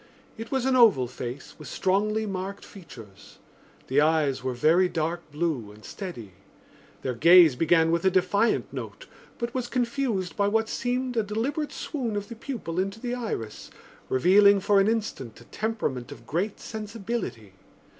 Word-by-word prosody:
It 225 +1 -8
was 265 -2 -1
an 265 -1 +2
oval 220 - +5
face 125 +2 -7
with - - -9
strongly 215 +3 0
marked 195 0 -5
features. 120 - -13 0.5
The 135 +3 +2
eyes 150 -4 +2
were 130 -1 -2
very 165 +8 +4
dark 165 0 -3
blue 145 -9 -2
and 105 +1 -15
steady. 170 - -7 0.7
Their 130 - -1
gaze 165 +2 +7
began 165 +2 +3
with 170 0 +1
a 190 - +5
defiant 190 +4 +1
note - - -7 0.3
but 235 0 -4
was 255 -2 -2
confused 240 -7 -1
by 200 -1 +1
what 220 +2 +1
seemed 250 0 -2
a - - +4
deliberate 240 +9 -2
swoon 245 -8 -4
of 205 0 -4
the 235 - -7
pupil 220 -9 -5
into 195 +3 -2
the 245 +1 -3
iris, 215 - -5 0.4
revealing 200 +8 +5
for 200 +1 +3
an 195 - +3
instant 215 - -3
a - - -14
temperament 150 - -3
of 145 - -11
great 190 +7 -2
sensibility. 210 - -5
195 Hz, 160 wpm, -26 LUFS, 150-225 Hz, 0.7 s, gaze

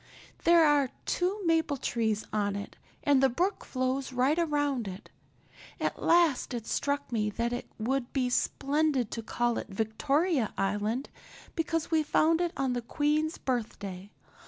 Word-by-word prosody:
There 335 -1 +7
are 290 -3 +4 0.2
two 375 +3 -1
maple 325 -3 +2
trees 220 -4 -1
on 205 -2 0
it 200 - -6 0.3
and 280 -2 +4
the 270 - +5
brook 360 - -1
flows 260 +1 -2
right 260 +6 +2
around 290 -7 0
it. 190 +1 -9 0.7
At - - -2
last 330 -7 +3
it 230 -2 -5
struck 285 -1 -1
me 210 -3 0
that 235 +3 -2
it 245 - -4
would 245 +3 -1
be 260 -2 +1
splendid 280 -2 +1
to 230 - -3
call 240 +1 0
it - - -7
Victoria 255 - 0
Island 210 +6 -1 0.4
because 330 0 -1
we 320 -1 +4
found 320 +2 +3
it 345 -1 0
on 265 -2 0
the 245 - -2
Queen's 300 +5 0
birthday. 205 -6 -4
265 Hz, 155 wpm, -29 LUFS, 230-310 Hz, 0.7 s, There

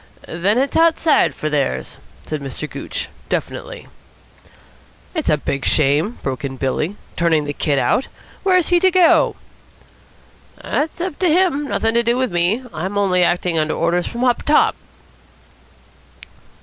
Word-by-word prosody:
"Then 190 +7 0
it's 275 +2 0
outside 325 -1 +3
for 155 - -4
theirs," 145 -3 -2 0.3
said 155 -2 -4
Mr. 140 +2 -6
Gooch - - -5 0.2
definitely. - - -4 1.3
"It's 320 -4 -2
a 150 - +3
big 140 -2 -3
shame," 155 - +1
broke 135 -1 -3
in 135 -1 -4
Billy, 145 +8 -2 0.2
"turning 165 -3 +1
the 145 - -3
kid 145 -1 0
out. 250 - +1 0.3
Where's 365 -3 +2
he 350 -1 +4
to 375 +1 +4
go?" 365 -2 +4 1.2
"That's 310 +3 -2
up 355 -4 -4
to 365 - +2
him. 315 -4 +2
Nothing 225 -4 0
to 235 - +3
do 235 +1 +1
with 255 -4 0
me. 175 +8 +1
I'm 185 +6 -4
only 185 -3 +2
acting 175 -1 +1
under 155 0 0
orders 170 +1 0
from 240 +1 -4
up 245 -2 +2
top." 300 - +3
195 Hz, 150 wpm, -19 LUFS, -, 1.3 s, he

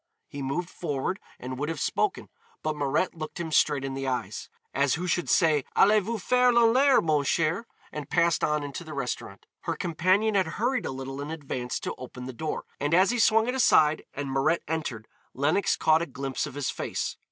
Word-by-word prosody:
He 145 - -7
moved 140 +6 -2
forward 155 +4 -3 0.2
and 130 +1 -6
would 145 +2 -2
have 165 -3 -3
spoken, 415 - -1 0.3
but 155 - -1
Mirette 145 +5 0
looked 155 +1 -7
him 165 -2 -4
straight 145 -3 +3
in 135 - -4
the 135 0 -3
eyes, 125 -1 -3 0.2
as 140 -1 +2
who 175 +3 -4
should 175 0 0
say 155 -5 +4
Allez 210 +2 +5
vous 225 +4 -3
faire 250 +5 +3
lanlaire, 245 +3 +5
mon 155 -3 +1
cher, 165 - 0 0.2
and 150 -2 -6
passed 170 -2 +2
on 150 -1 +1
into 145 +4 -6
the 155 -2 -8
restaurant. 130 -3 -5
Her - - -3
companion 185 +6 +1
had 195 -2 +2
hurried 250 +4 0
a - - -3
little 135 +1 -6
in 145 - -5
advance 135 -6 -4
to - - -3
open 125 0 -8
the 130 - -6
door, 155 +5 -4
and 145 +3 +1
as 185 +4 +5
he 245 - -1
swung 225 0 +4
it 250 - 0
aside 155 -12 +4
and 140 -1 -4
Mirette 145 +5 +1
entered 145 -9 -3 0.3
Lenox 150 +8 +2
caught 160 +1 +4
a 170 - -2
glimpse 135 +1 -3
of 140 - -10
his 145 -2 -1
face. - - -3
155 Hz, 205 wpm, -27 LUFS, 140-185 Hz, 0.3 s, Allez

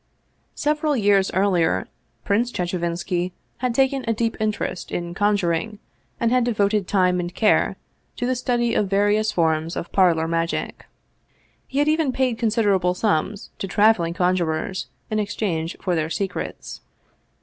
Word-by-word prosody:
Several 300 -1 0
years 200 -3 +3
earlier 175 - +2 0.4
Prince 230 +5 +1
Chechevinski 175 0 -2 0.3
had 250 -2 -1
taken 270 0 +2
a 230 - +2
deep 225 0 -1
interest 215 -4 -2
in 170 0 -3
conjuring 205 0 0 0.4
and 230 0 +1
had 250 0 +3
devoted 210 -4 +1
time 180 -2 +2
and 175 0 -4
care 215 - +3 0.4
to 245 - -3
the 255 +1 +1
study 240 -1 0
of 205 -4 +1
various 205 +2 +2
forms 160 -2 0
of 170 - -5
parlor 170 -4 +3
magic. 165 0 -2 0.8
He 270 - -6
had 290 +1 +3
even 310 -3 +2
paid 255 -3 0
considerable 205 -6 +2
sums 200 0 -1
to 195 - -3
traveling 190 -4 +3
conjurers 180 0 0 0.2
in 215 - +1
ex 210 +1 -3
change 165 -6 -2
for 180 - -1
their 160 -2 0
secrets. 195 +3 -4
200 Hz, 145 wpm, -23 LUFS, 175-230 Hz, 0.8 s, years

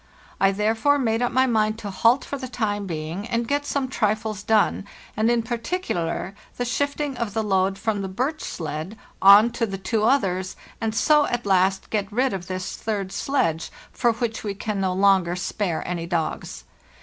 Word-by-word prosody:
I 195 0 +4
therefore 220 +8 +2
made 225 -4 0
up 245 - +1
my 260 +1 +3
mind 215 -3 +1
to 205 -3 -6
halt 230 +7 +3
for - - -4
the 260 - -5
time 205 -4 -2
being 165 +5 -4
and 235 -1 -1
get 285 +2 -1
some 275 -2 -1
trifles 215 -3 -1
done, 210 -1 +2 0.3
and 220 +2 +2
in 235 -1 +2
particular 230 - -3 0.2
the 245 - -1
shifting 285 +2 -1
of 225 -4 -3
the 220 - +1
load 195 -1 +1
from 210 0 -1
the 195 - -3
birch 260 +11 -2
sledge 160 +5 -5 0.2
on 205 +4 +8
to 230 -1 -1
the 195 -1 -4
two 210 +3 -1
others, 190 -7 +1 0.3
and 220 -1 -1
so 300 +4 +4
at 240 -2 -2
last 190 0 +2
get 205 -2 -1
rid 255 +3 +1
of 180 -2 -5
this 185 -1 -4
third 200 -4 -3
sledge, 165 - 0 0.2
for 240 -2 +2
which 230 0 -3
we 205 -2 -3
can 205 0 -3
no 190 -1 +1
longer 190 -2 +3
spare 180 -1 -2
any 170 -1 -3
dogs. 170 -2 -3
215 Hz, 185 wpm, -24 LUFS, 190-240 Hz, 0.3 s, on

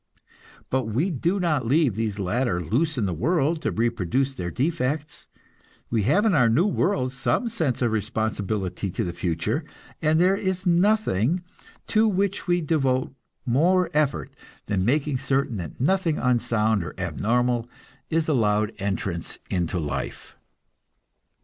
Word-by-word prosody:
But 130 -2 +1
we 130 - 0
do 170 +7 0
not 155 -9 0
leave 140 -2 +3
these 110 -1 -2
latter 100 0 0
loose 130 - 0
in 110 - +1
the 95 - -1
world 155 - +1
to - - 0
reproduce 120 +4 0
their 90 -9 -4
defects; 150 - -2 0.6
we 115 -2 +2
have 205 +9 +3
in 215 - +3
our 125 -7 +4
new 140 +11 +3
world 140 -10 0
some 135 - 0
sense 160 - -1
of 120 - +2
responsibility 105 -3 -2
to - - -2
the 85 - -3
future, 90 - -1 0.4
and 160 0 +3
there 185 +2 +4
is 190 -1 -2
nothing 175 - +2 0.4
to 220 0 +3
which 200 -1 0
we 175 0 +2
devote 135 -5 0 0.3
more 175 +9 +3
effort 150 -2 0 0.3
than 100 -3 0
making 140 +3 +1
certain 135 -4 0
that 85 -5 -7
nothing 165 +2 +1
unsound 115 -4 +1
or 75 - -7
abnormal 115 +7 0 0.4
is 160 0 0
allowed 110 -6 +2
entrance 95 -3 -3
into 90 -1 -1
life. 75 -4 -4
130 Hz, 145 wpm, -25 LUFS, 105-165 Hz, 0.6 s, our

